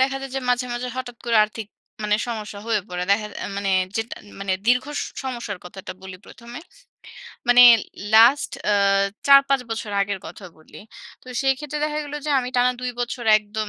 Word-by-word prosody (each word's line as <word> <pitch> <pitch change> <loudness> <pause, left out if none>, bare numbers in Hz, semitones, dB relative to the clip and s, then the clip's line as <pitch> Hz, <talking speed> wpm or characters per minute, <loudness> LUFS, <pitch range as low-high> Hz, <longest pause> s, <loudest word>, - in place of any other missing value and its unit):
দেখা 270 +1 +2
যায় 270 0 -7
যে 270 - -1
মাঝে, 250 0 +1
মাঝে 245 +1 -4
হঠাৎ 250 -2 -6
করে 235 -1 +2
আর্থিক 215 0 -8 0.4
মানে 210 0 +2
সমস্যা 215 -3 -5
হয়ে 225 -2 +1
পড়ে। 180 0 -4
দেখা 210 +1 +2 0.2
আ - - -3
মানে 200 -1 -1 0.3
যেটান 225 +1 -4 0.2
মানে 195 -1 -1
দীর্ঘ 250 +1 +3
স - - -1 0.2
সমস্যার 240 -6 -5
কথাটা 185 +1 -9
বলি 190 -1 -9
প্রথমে। 235 +1 -11 0.9
মানে 245 0 +8 0.5
লাস্ট 235 +6 +6 0.2
আ - - +3 0.5
৪-৫ 275 -1 +6
বছর 225 -1 -4
আগের 200 0 -3
কথা 200 - -11
বলি। 155 - -15 0.4
তো - - -24 0.2
সেই 270 0 +3
ক্ষেত্রে 300 +1 -5
দেখা 300 0 -2
গেল 290 0 -8
যে - - -1
আমি 250 - -5
টানা 250 +1 +3
২ 250 0 -2
বছর 240 0 -4
একদম 215 0 -5
240 Hz, 185 wpm, -22 LUFS, 210-260 Hz, 0.9 s, মানে